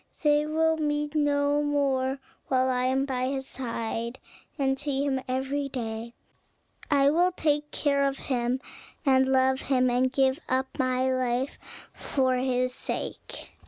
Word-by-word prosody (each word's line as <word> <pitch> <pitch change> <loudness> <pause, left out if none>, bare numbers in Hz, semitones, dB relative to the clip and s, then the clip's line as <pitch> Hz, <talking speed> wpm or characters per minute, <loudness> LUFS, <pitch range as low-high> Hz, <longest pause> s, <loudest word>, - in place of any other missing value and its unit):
They 295 0 +3
will 320 +1 +2
meet 295 -1 -1
no 290 -1 +2
more: 275 -2 +1 0.3
while 260 0 +2
I 250 0 0
am 265 +1 +1
by 255 -2 -1
his 265 0 -3
side, 235 -1 -4 0.4
and 270 -2 +1
see 285 -1 -1
him 265 -2 0
every 270 +2 -1
day. 230 -2 -5 0.7
I 280 -1 +4
will 350 +4 +3
take 295 -4 0
care 280 -2 +1
of 275 0 -1
him, 250 0 -1 0.4
and 265 -1 +4
love 260 0 +3
him, 255 -2 +2
and 255 +1 +2
give 265 +1 +2
up 260 +1 +2
my 255 0 +1
life 255 +1 -1 0.3
for 260 -2 0
his 255 0 0
sake." - - -6
265 Hz, 145 wpm, -27 LUFS, 255-285 Hz, 0.7 s, I